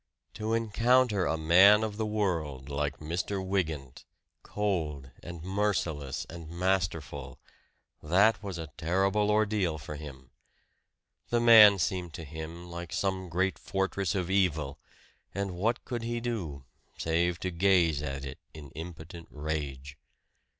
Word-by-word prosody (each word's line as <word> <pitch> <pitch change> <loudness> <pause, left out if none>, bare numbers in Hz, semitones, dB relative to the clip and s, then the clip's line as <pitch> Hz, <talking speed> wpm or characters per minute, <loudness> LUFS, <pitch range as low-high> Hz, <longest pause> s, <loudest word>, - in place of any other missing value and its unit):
To 110 +1 -1
encounter 115 -2 +2
a 80 - 0
man 95 +7 +6
of 105 -2 -3
the 110 -1 -1
world 80 -11 -2
like 70 -1 -2
Mr. 90 +5 -3
Wygant, 80 -9 -2 0.4
cold 80 -10 -2
and 85 -2 -8
merciless 90 -8 -1
and 80 -1 -9
masterful 85 -7 -2 0.6
that 100 +6 +3
was 100 -4 -5
a 80 -4 -7
terrible 95 +6 +1
ordeal 105 -6 +1
for 75 0 -7
him. 70 -4 -10 1.0
The 120 - +2
man 110 -4 +9
seemed 90 -2 -2
to 80 - -7
him 80 +3 -8
like 85 0 -7
some 95 -2 -1
great 95 +3 0
fortress 95 0 -1
of 90 -1 -1
evil; 80 -8 +1 0.6
and 100 -1 -2
what 110 +7 -1
could 120 -2 -3
he 120 +1 -2
do, 90 - -4 0.3
save 85 +1 0
to 95 - -2
gaze 85 -4 +3
at 70 -1 -4
it 65 - -8 0.2
in 75 -3 -10
impotent 85 +1 -9
rage? 75 -2 -5
85 Hz, 135 wpm, -29 LUFS, 75-100 Hz, 1.0 s, man